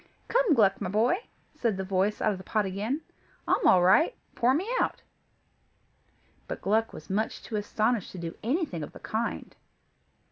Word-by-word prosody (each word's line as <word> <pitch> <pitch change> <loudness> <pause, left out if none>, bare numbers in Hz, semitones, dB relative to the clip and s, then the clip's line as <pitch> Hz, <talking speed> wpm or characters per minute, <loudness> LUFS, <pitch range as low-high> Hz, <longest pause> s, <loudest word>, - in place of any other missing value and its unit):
"Come, 475 -10 +3
Gluck, 200 -4 +3
my 190 - -2
boy," 220 - +3 0.4
said 235 -9 -1
the 190 - -2
voice 195 +2 0
out 215 - +3
of 195 - -4
the - - -9
pot 215 +1 0
again, 210 +10 -2 0.5
"I'm - - +3
all 180 -1 +6
right; 315 - +5 0.2
pour 255 +2 +3
me 365 +7 -1
out." - - -1 1.4
But - - -5
Gluck 220 +3 +1
was - - -10
too 190 - -5
much 220 +3 -2
astonished 215 +1 0
to - - -8
do 170 -1 -5
anything 255 - -1
of 150 - -7
the - - -11
kind. 225 +2 -3
215 Hz, 175 wpm, -28 LUFS, 190-245 Hz, 1.4 s, all